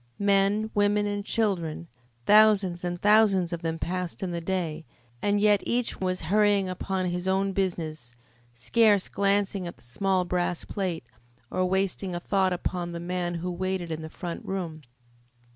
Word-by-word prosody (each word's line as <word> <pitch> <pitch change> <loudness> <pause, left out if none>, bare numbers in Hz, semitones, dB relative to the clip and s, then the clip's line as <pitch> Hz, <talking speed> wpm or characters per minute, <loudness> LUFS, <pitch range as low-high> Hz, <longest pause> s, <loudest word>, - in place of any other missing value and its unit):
Men, 200 +2 +2
women, 205 0 +2
and 205 0 -2
children, 175 -7 -1 0.4
thousands 205 -4 +5
and 175 0 -3
thousands 200 -4 +4
of 170 - -4
them 165 -1 -2
passed 180 +2 -4
in 185 - -2
the 170 0 -3
day, 165 -3 -2 0.4
and 205 0 +2
yet 205 -1 +4
each 240 0 -1
was 185 -1 -1
hurrying 205 +3 +3
on - - -3
upon 185 0 -2
his 180 +1 -3
own 195 +1 +1
business, 160 -9 -3 0.4
scarce 205 - +3
glancing 200 -2 0
at 170 - -8
the - - -21
small 185 +9 0
brass 175 -1 -1
plate, 180 - -3 0.5
or 185 0 +1
wasting 190 -1 -1
a - - -2
thought 190 +1 +1
upon 175 -1 -3
the 170 - -4
man 175 0 -2
who 180 +2 -3
waited 185 -1 -3
in 160 0 -4
the 160 - -7
front 170 +1 -6
room. 170 -5 -4
185 Hz, 165 wpm, -27 LUFS, 175-200 Hz, 0.5 s, thousands